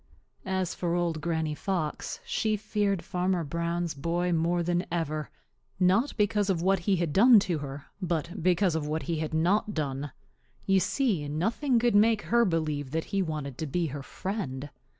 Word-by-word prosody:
As 190 Hz, -2 st, -1 dB
for 175 Hz, -1 st, -1 dB
Old 170 Hz, -3 st, -1 dB
Granny 160 Hz, -1 st, -1 dB
Fox, 175 Hz, -, -3 dB
she 220 Hz, -, 0 dB
feared 205 Hz, -3 st, -1 dB
Farmer 180 Hz, 0 st, 0 dB
Brown's 170 Hz, +2 st, -2 dB
boy 170 Hz, +5 st, -1 dB
more 170 Hz, +1 st, +1 dB
than 175 Hz, +1 st, 0 dB
ever, 155 Hz, -3 st, -2 dB, 0.5 s
not 195 Hz, +10 st, +3 dB
because 210 Hz, -1 st, +2 dB
of 185 Hz, -4 st, +2 dB
what 190 Hz, +2 st, +2 dB
he 190 Hz, +3 st, +1 dB
had 170 Hz, -4 st, -1 dB
done 230 Hz, +3 st, +8 dB
to 175 Hz, -5 st, -1 dB
her 140 Hz, 0 st, -7 dB, 0.2 s
but 170 Hz, +1 st, -2 dB
because 180 Hz, +1 st, +3 dB
of 155 Hz, -2 st, -2 dB
what 155 Hz, +1 st, -2 dB
he 165 Hz, -1 st, -2 dB
had 155 Hz, 0 st, -2 dB
not 195 Hz, +6 st, +1 dB
done. 145 Hz, -2 st, -2 dB, 0.5 s
You 195 Hz, -1 st, +4 dB
see, 190 Hz, -, 0 dB
nothing 225 Hz, -, 0 dB
could 240 Hz, +1 st, +2 dB
make 215 Hz, +1 st, +4 dB
her 235 Hz, +1 st, +3 dB
believe 155 Hz, -6 st, -1 dB
that 160 Hz, +3 st, -2 dB
he 195 Hz, -, +2 dB
wanted 150 Hz, -6 st, -4 dB
to 160 Hz, -, -2 dB
be 170 Hz, +5 st, 0 dB
her 145 Hz, -, -4 dB
friend. 145 Hz, -, -5 dB
175 Hz, 175 wpm, -28 LUFS, 155-195 Hz, 0.5 s, done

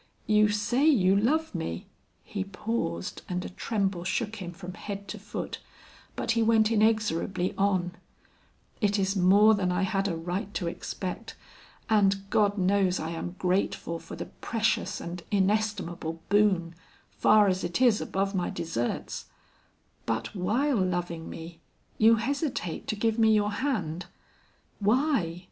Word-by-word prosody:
You 215 Hz, 0 st, +4 dB
say 225 Hz, +6 st, +1 dB
you 195 Hz, -11 st, +5 dB
love 300 Hz, +10 st, +1 dB
me 85 Hz, -, -4 dB, 0.2 s
" -, -, -41 dB
he 200 Hz, -2 st, -1 dB
paused, 195 Hz, -, -3 dB
and 180 Hz, 0 st, -2 dB
a -, -, -5 dB
tremble 195 Hz, -2 st, -2 dB
shook 220 Hz, +4 st, -2 dB
him 180 Hz, -4 st, -6 dB
from 180 Hz, +1 st, -8 dB
head 200 Hz, 0 st, -7 dB
to 210 Hz, -, -6 dB
foot, 210 Hz, +1 st, -5 dB, 0.6 s
but 230 Hz, -, -1 dB
he 230 Hz, 0 st, +2 dB
went 220 Hz, -1 st, +4 dB
inexorably 210 Hz, -5 st, +1 dB
on 190 Hz, -3 st, +1 dB, 0.9 s
"it 205 Hz, -1 st, +2 dB
is 195 Hz, 0 st, 0 dB
more 200 Hz, +4 st, +6 dB
than 190 Hz, -3 st, +1 dB
I 180 Hz, +2 st, +1 dB
had 195 Hz, 0 st, 0 dB
a 175 Hz, -, -1 dB
right 180 Hz, +4 st, -3 dB
to 180 Hz, -, -1 dB
expect, 180 Hz, +2 st, -5 dB, 0.5 s
and 195 Hz, -3 st, +2 dB
God 205 Hz, -1 st, +3 dB
knows 190 Hz, -1 st, +2 dB
I 160 Hz, +1 st, -3 dB
am 175 Hz, +2 st, -5 dB
grateful 180 Hz, -2 st, -1 dB
for -, -, -9 dB
the -, -, -5 dB
precious 225 Hz, -1 st, -1 dB
and 170 Hz, +1 st, -6 dB
inestimable 195 Hz, -5 st, 0 dB
boon, 195 Hz, -5 st, +3 dB, 0.4 s
far 210 Hz, -1 st, +5 dB
as 185 Hz, -1 st, 0 dB
it 175 Hz, +4 st, -2 dB
is 240 Hz, -5 st, +4 dB
above 195 Hz, +1 st, -1 dB
my 180 Hz, -2 st, -1 dB
deserts; 120 Hz, -8 st, -3 dB, 0.8 s
but 115 Hz, 0 st, -2 dB
while 235 Hz, +9 st, +1 dB
loving 175 Hz, -3 st, -2 dB
me, 165 Hz, +1 st, -9 dB, 0.4 s
you 225 Hz, +1 st, +7 dB
hesitate 255 Hz, -, -2 dB
to -, -, -1 dB
give 225 Hz, +2 st, 0 dB
me 220 Hz, -1 st, +5 dB
your 210 Hz, 0 st, +2 dB
hand. 185 Hz, -, -2 dB, 0.7 s
Why? 215 Hz, -, +1 dB
195 Hz, 150 wpm, -28 LUFS, 180-215 Hz, 0.9 s, you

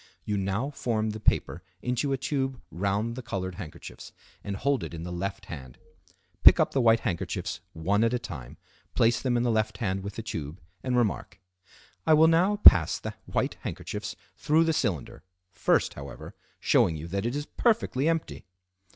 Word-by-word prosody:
You 105 Hz, -, -1 dB
now 100 Hz, +8 st, -1 dB
form 110 Hz, -5 st, -1 dB
the 110 Hz, -, -6 dB
paper 90 Hz, -4 st, +1 dB, 0.2 s
into 125 Hz, +3 st, -1 dB
a 135 Hz, -, +1 dB
tube 135 Hz, -1 st, -2 dB
round 100 Hz, +6 st, -1 dB
the 130 Hz, -, -5 dB
colored 95 Hz, -6 st, -4 dB
handkerchiefs 80 Hz, -4 st, -10 dB, 0.3 s
and 100 Hz, -, -4 dB
hold 140 Hz, +6 st, 0 dB
it -, -, -6 dB
in 80 Hz, -, -6 dB
the 90 Hz, -, -6 dB
left 95 Hz, +3 st, -4 dB
hand. 65 Hz, -5 st, -9 dB, 0.6 s
Pick -, -, +8 dB
up -, -, +3 dB
the 135 Hz, -, +1 dB
white 115 Hz, -1 st, +4 dB
handkerchiefs 90 Hz, -8 st, -3 dB
one 100 Hz, +7 st, +1 dB
at 115 Hz, -, +3 dB
a 125 Hz, -, +1 dB
time, 75 Hz, -, -8 dB, 0.4 s
place 115 Hz, 0 st, +3 dB
them 125 Hz, -2 st, +1 dB
in 120 Hz, -, +1 dB
the 120 Hz, -, +2 dB
left 110 Hz, -1 st, 0 dB
hand 95 Hz, -3 st, -1 dB
with 100 Hz, +1 st, -7 dB
the 115 Hz, -, -5 dB
tube, 80 Hz, -7 st, -5 dB, 0.2 s
and 125 Hz, -1 st, 0 dB
remark:—"I 95 Hz, -, -2 dB
will 160 Hz, +1 st, +6 dB
now 175 Hz, +5 st, +3 dB
pass 205 Hz, -, +7 dB
the -, -, -6 dB
white -, -, -1 dB
handkerchiefs -, -, -5 dB, 0.2 s
through 160 Hz, +2 st, +3 dB
the 165 Hz, 0 st, +1 dB
cylinder, 95 Hz, -, -2 dB, 0.3 s
first, 85 Hz, -3 st, +1 dB
however, 70 Hz, -3 st, -9 dB, 0.3 s
showing 80 Hz, -, +3 dB
you 80 Hz, +2 st, -6 dB
that 100 Hz, +5 st, -1 dB
it 120 Hz, -, -2 dB
is 145 Hz, 0 st, -3 dB
perfectly 165 Hz, -, +1 dB
empty." 165 Hz, -1 st, -2 dB
110 Hz, 180 wpm, -27 LUFS, 95-130 Hz, 0.6 s, Pick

